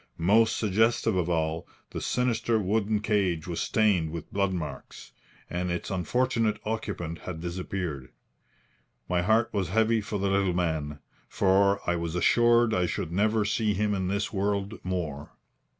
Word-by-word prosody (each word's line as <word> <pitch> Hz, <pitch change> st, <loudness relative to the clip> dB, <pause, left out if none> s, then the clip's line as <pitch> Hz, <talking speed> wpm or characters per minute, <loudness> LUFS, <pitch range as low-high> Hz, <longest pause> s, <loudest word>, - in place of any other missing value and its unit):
Most 110 Hz, +6 st, +3 dB
suggestive 110 Hz, +1 st, +2 dB
of 90 Hz, -2 st, 0 dB
all, 80 Hz, -1 st, -1 dB, 0.2 s
the -, -, -5 dB
sinister 120 Hz, -2 st, +1 dB
wooden 105 Hz, +1 st, 0 dB
cage 95 Hz, -7 st, 0 dB
was 85 Hz, -2 st, -3 dB
stained 100 Hz, -7 st, +2 dB
with 80 Hz, -1 st, -7 dB
blood 100 Hz, -1 st, +1 dB
marks, 80 Hz, -6 st, -6 dB, 0.4 s
and 90 Hz, +1 st, -3 dB
its 90 Hz, +2 st, -3 dB
unfortunate 115 Hz, +4 st, 0 dB
occupant 85 Hz, -7 st, -4 dB
had 90 Hz, -3 st, -6 dB
disappeared. 85 Hz, -5 st, -4 dB, 1.0 s
My 90 Hz, -1 st, +1 dB
heart 110 Hz, +5 st, +2 dB
was 95 Hz, -5 st, -1 dB
heavy 110 Hz, +2 st, +2 dB
for 105 Hz, 0 st, -4 dB
the 100 Hz, 0 st, -1 dB
little 95 Hz, -2 st, +1 dB
man, 80 Hz, -4 st, -1 dB, 0.3 s
for 100 Hz, +1 st, +2 dB
I 85 Hz, 0 st, +1 dB
was 85 Hz, 0 st, -3 dB
assured 120 Hz, +5 st, +4 dB
I 90 Hz, -1 st, +1 dB
should 80 Hz, -, -3 dB
never 105 Hz, +3 st, +2 dB
see 105 Hz, -1 st, 0 dB
him 105 Hz, +1 st, 0 dB
in 95 Hz, -2 st, -1 dB
this 100 Hz, +3 st, -2 dB
world 100 Hz, +1 st, -2 dB
more. 80 Hz, -6 st, -4 dB
100 Hz, 150 wpm, -27 LUFS, 85-110 Hz, 1.0 s, assured